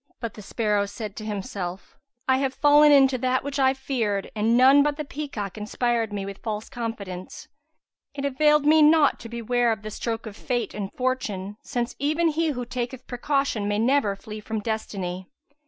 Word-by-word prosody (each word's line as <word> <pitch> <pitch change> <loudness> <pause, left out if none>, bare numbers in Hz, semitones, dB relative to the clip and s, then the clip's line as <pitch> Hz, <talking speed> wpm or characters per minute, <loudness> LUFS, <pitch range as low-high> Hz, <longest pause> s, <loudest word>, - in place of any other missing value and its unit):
But 230 -3 -4
the 210 - -10
sparrow 210 -1 0
said 210 0 -7
to 215 - -6
himself, 195 -3 -5 0.3
"I 260 0 +4
have 265 -1 -1
fallen 295 0 +6
into 270 -2 +5
that 255 +1 +1
which 280 0 -3
I 265 0 +4
feared 225 -7 -2
and 220 +2 +2
none 265 +3 +7
but 295 0 +1
the 300 - -4
peacock 230 -10 -5
inspired 230 +1 -1
me 200 -1 -3
with 195 0 -7
false 215 -1 -4
confidence. 210 -7 -6 0.7
It 280 -1 -3
availed 300 +2 +3
me 310 +1 +6
naught 300 -1 +5
to 230 - -9
beware 235 +1 +1
of 215 -1 -3
the 215 - -6
stroke 225 +1 -3
of 215 -2 -8
fate 245 +1 -2
and 200 -2 -4
fortune, 210 -6 -2
since 240 -1 -3
even 310 +4 +2
he 320 +1 0
who 250 -5 -2
taketh 250 +1 -5
precaution 250 -4 -1
may 205 0 0
never 230 -2 +2
flee 215 +2 -8
from 220 +1 -4
destiny. 195 -4 -4
235 Hz, 185 wpm, -25 LUFS, 210-275 Hz, 0.7 s, none